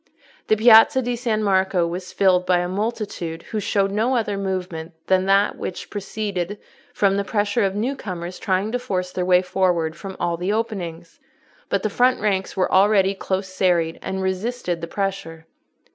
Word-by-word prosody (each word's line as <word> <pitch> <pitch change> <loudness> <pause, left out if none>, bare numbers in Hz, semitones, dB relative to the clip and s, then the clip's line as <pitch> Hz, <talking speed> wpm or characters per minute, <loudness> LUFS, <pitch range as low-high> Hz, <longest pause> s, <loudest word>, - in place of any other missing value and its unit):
The 215 - +3
Piazza 225 +3 +7
di 245 0 -1
San 230 -3 -1
Marco 190 -3 +2
was 180 +2 -5
filled 185 -2 +3
by 180 0 +2
a 175 0 -1
multitude 195 -4 -4
who 215 - -4
showed 195 -1 0
no 225 +6 +1
other 220 -4 0
movement 185 -4 -4
than 190 0 +2
that 195 +1 +3
which 185 - -6
proceeded 205 -2 -4 0.3
from 195 -1 +2
the 200 - 0
pressure 205 0 0
of 195 0 0
new 240 +7 -1
comers 180 -6 -6
trying 195 +1 0
to 250 - -1
force 185 -7 -3
their 180 -1 -2
way 180 0 +4
forward 175 -4 0
from 195 -2 -8
all 170 -1 -1
the 180 +4 -1
openings: 180 -7 -4 0.5
but - - 0
the - - +2
front 250 +4 +3
ranks 195 -3 -1
were 185 - +1
already 195 0 +4
close 190 0 -3
serried 175 -3 +1
and 190 0 -3
resisted 190 -2 -2
the 170 - -4
pressure. 190 -4 -4
190 Hz, 175 wpm, -22 LUFS, 180-210 Hz, 0.5 s, Piazza